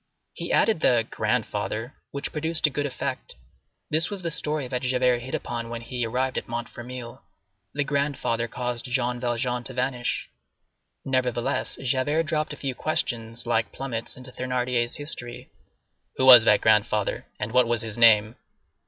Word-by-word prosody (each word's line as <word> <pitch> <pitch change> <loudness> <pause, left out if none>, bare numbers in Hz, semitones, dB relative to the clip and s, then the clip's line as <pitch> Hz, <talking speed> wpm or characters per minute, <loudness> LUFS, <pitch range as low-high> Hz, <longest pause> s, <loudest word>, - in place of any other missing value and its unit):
He - - -5
added 220 -7 +3
the 120 -6 +3
"grandfather," 115 +5 -2 0.2
which 140 0 -5
produced 160 +1 +1
a 150 - +3
good 145 +2 -1
effect. 135 - -5 0.6
This 160 +2 +3
was 200 -3 -6
the 170 - -2
story 150 -2 -2
that 125 0 -3
Javert 125 -1 +2
hit 130 +2 -5
upon 115 -1 -4
when 115 0 -5
he 120 0 -3
arrived 130 +3 0
at - - -14
Montfermeil. 120 +1 -7 0.5
The 145 - +1
grandfather 140 -5 -1
caused 125 0 -1
Jean 125 -1 -1
Valjean 120 0 -1
to 130 - -4
vanish. 125 -1 -1 0.8
Nevertheless, 125 -3 0
Javert 135 +5 +1
dropped 155 -1 -1
a 145 - -6
few 135 -2 -3
questions, 115 -5 -2
like 115 -1 0
plummets, 125 -4 -4
into 130 0 -11
Thénardier's 125 -1 -1
history. 120 -5 -2 0.7
"Who 130 - +2
was 125 -4 +10
that - - +5
grandfather? 105 -1 +2
and 105 +1 -3
what 125 0 +4
was 120 -1 0
his 110 -2 -3
name?" 110 -1 +5
125 Hz, 155 wpm, -25 LUFS, 120-135 Hz, 0.8 s, was